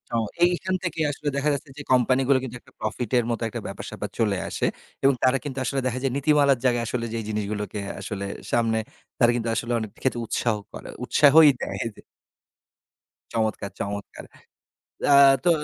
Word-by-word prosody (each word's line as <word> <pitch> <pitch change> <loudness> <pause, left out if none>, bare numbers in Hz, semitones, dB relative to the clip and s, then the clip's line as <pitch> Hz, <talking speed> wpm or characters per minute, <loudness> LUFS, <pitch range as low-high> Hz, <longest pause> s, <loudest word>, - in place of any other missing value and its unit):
ও - - +3 0.3
এইখান 180 +1 0
থেকে 170 -2 -3
আসলে 145 +1 -7
দেখা 140 +2 +1
যাচ্ছে 140 +1 -5
যে 145 - -6
কোম্পানিগুলো 130 +2 +4
কিন্তু 125 -2 -6
একটা - - -22
প্রফিট 110 +1 -3
এর 120 - +2
মতো 115 - -2
একটা - - -5
ব্যাপার-স্যাপার - - -6
চলে 105 -4 +2
আসে। - - -1 0.4
এবং 135 +1 +6
তারা 130 +1 +4
কিন্তু 140 -3 -6
আসলে 135 +2 -1
দেখা 130 0 -2
যায় 135 - +1
নীতিমালার 140 -2 +3
জায়গায় 120 -2 +2
আসলে 115 0 -2
যেই 115 -1 -2
জিনিসগুলোকে 105 -1 -3 0.2
আসলে 100 -2 -5 0.3
সামনে 115 -1 +2 0.4
তারা 120 -1 +5
কিন্তু 115 -1 -1
আসলে 120 +2 -2
অনেক 110 -1 -4
ক্ষেত্রে 125 -3 0
উৎসাহ 115 0 0 0.2
করে - - -9 0.2
উৎসাহই 150 +2 +7
দেয় - - -4 0.2
যে - - -14 1.3
চমৎকার, 110 -3 -1
চমৎকার! 100 0 -5 0.9
আ - - +8 0.3
তো 175 - +5
125 Hz, 170 wpm, -25 LUFS, 110-140 Hz, 1.3 s, আ